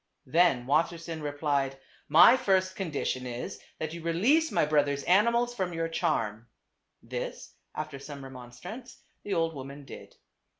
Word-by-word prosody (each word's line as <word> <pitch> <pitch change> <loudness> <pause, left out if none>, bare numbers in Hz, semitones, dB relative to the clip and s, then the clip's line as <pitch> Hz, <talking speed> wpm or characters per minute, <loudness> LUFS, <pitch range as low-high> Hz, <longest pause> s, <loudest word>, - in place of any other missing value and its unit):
Then 145 -4 +3
Wassersein 165 +3 0
replied, 145 -2 -1 0.2
" - - -33
My 240 - +9
first 190 -7 +1
condition 145 -8 -2
is, 120 0 -5 0.2
that 155 0 -4
you 170 - -7
release 230 - +2
my - - +3
brother's 145 -2 +1
animals 235 +6 +3
from 185 -6 -2
your 165 0 -1
charm." 115 -10 -1 0.6
This, - - -6 0.2
after 140 - -5
some 140 0 -9
remonstrance, 135 - -10 0.2
the 205 - -2
old 165 0 +1
woman 140 0 -8
did. - - -11
160 Hz, 140 wpm, -29 LUFS, 140-185 Hz, 0.6 s, My